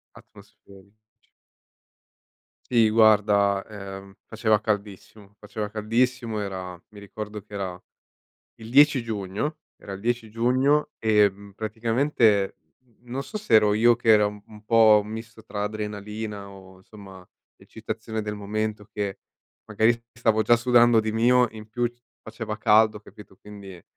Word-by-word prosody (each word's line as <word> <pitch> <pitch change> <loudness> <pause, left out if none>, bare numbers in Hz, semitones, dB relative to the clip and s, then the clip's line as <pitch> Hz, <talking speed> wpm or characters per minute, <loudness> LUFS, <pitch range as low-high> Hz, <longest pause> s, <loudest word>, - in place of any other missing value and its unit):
Atmosferici. 100 0 -18 1.7
Sì 115 -3 +3
guarda, 105 -2 +3
uhm, 100 -2 -9
faceva 110 -1 +1
caldissimo, 105 -1 -5
faceva 105 0 -6
caldissimo 115 +1 -1
era 95 -2 -6
mi 105 -1 -14
ricordo 105 +1 -8
che 105 +1 -19
era 95 -2 -5 0.8
il 110 -1 -11
10 140 -1 +5
giugno. 110 +8 -4 0.2
Era 100 - -10
il 95 - -9
10 120 -1 -2
giugno 130 +6 +1
e, 105 -2 +3
mhmm, 100 +1 -15
praticamente 110 -1 0 0.3
n 120 -4 -33
non 135 +2 -3
so 215 - -7
se 165 - -1
ero 105 -1 +5
io 115 +2 +4
che 115 -1 +1
era 105 -1 +6
un 105 +1 -10
po' 110 -2 +6
un 105 - -11
misto 110 0 -9
tra 105 -1 -5
adrenalina 105 -1 -5
o 95 -1 -15
insomma 95 -2 -14 0.3
eccitazione 110 0 -6
del 105 0 -4
momento, 105 +1 -4
che 100 -2 -4 0.4
magari 110 +2 +2
s 115 0 -10 0.2
stavo 110 -2 +2
già 120 - +4
sudando 120 -1 +4
di 110 - -3
mio, 120 +2 +3
in 110 -1 -11
più 120 +1 -1
c 120 0 -33 0.2
faceva 110 -1 -6
caldo 110 -1 +3
capito? 105 -1 -16
Quindi, 100 -4 -12
110 Hz, 145 wpm, -24 LUFS, 100-115 Hz, 1.7 s, era